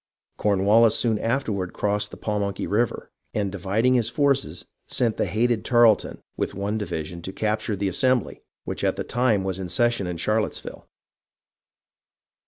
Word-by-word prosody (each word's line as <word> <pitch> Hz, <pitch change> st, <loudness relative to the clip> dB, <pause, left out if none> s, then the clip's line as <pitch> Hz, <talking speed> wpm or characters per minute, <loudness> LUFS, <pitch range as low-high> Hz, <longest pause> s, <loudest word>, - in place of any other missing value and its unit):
Cornwallis 105 Hz, +3 st, +4 dB
soon 110 Hz, -3 st, +1 dB
afterward 110 Hz, -7 st, -1 dB
crossed 105 Hz, 0 st, -1 dB
the -, -, -11 dB
Pamunkey 100 Hz, -2 st, -2 dB
River, 110 Hz, +3 st, -1 dB, 0.2 s
and 100 Hz, -2 st, 0 dB
dividing 100 Hz, +6 st, +1 dB
his 120 Hz, -3 st, +2 dB
forces 140 Hz, 0 st, 0 dB, 0.2 s
sent 115 Hz, -3 st, +1 dB
the -, -, 0 dB
hated 115 Hz, 0 st, +1 dB
Tarleton 120 Hz, -3 st, +3 dB
with -, -, -3 dB
one 100 Hz, +3 st, -2 dB
division 85 Hz, -4 st, -5 dB
to 95 Hz, -, -5 dB
capture 110 Hz, +1 st, -1 dB
the 100 Hz, 0 st, -1 dB
Assembly, 125 Hz, +4 st, +1 dB, 0.2 s
which -, -, -5 dB
at -, -, +1 dB
the -, -, -3 dB
time 120 Hz, -5 st, +1 dB
was 95 Hz, -1 st, -3 dB
in 90 Hz, -2 st, -5 dB
session 115 Hz, +1 st, +1 dB
at 85 Hz, -2 st, -4 dB
Charlotteville. 105 Hz, +5 st, -2 dB
105 Hz, 150 wpm, -24 LUFS, 100-120 Hz, 0.2 s, Cornwallis